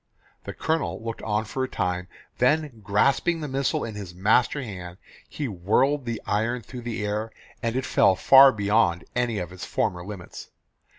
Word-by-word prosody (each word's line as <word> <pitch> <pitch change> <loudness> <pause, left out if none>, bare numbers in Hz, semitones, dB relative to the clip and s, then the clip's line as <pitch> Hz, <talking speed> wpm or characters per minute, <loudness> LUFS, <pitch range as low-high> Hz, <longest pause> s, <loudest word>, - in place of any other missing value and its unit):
The - - -5
Colonel 160 0 -1
looked 115 0 -5
on 105 0 -1
for 130 +5 -3
a 130 - -3
time, 90 -2 -2 0.3
then 130 -2 +1
grasping 140 - +2
the 150 - -4
missile 135 0 -1
in 110 - -5
his 100 -4 -8
master 110 +9 +2
hand 90 -6 -8 0.3
he 145 - -4
whirled 125 +8 +1
the 115 -2 -3
iron 115 +3 -1
through 125 +4 -9
the 115 -3 -4
air 105 +2 -2 0.3
and 115 0 -1
it 130 0 -1
fell 95 - +4
far 135 +8 +8
beyond 100 -5 +1
any 120 -3 0
of 90 -2 -4
its 95 0 -9
former 90 -5 -1
limits. 95 -2 -9
110 Hz, 175 wpm, -25 LUFS, 100-130 Hz, 0.3 s, far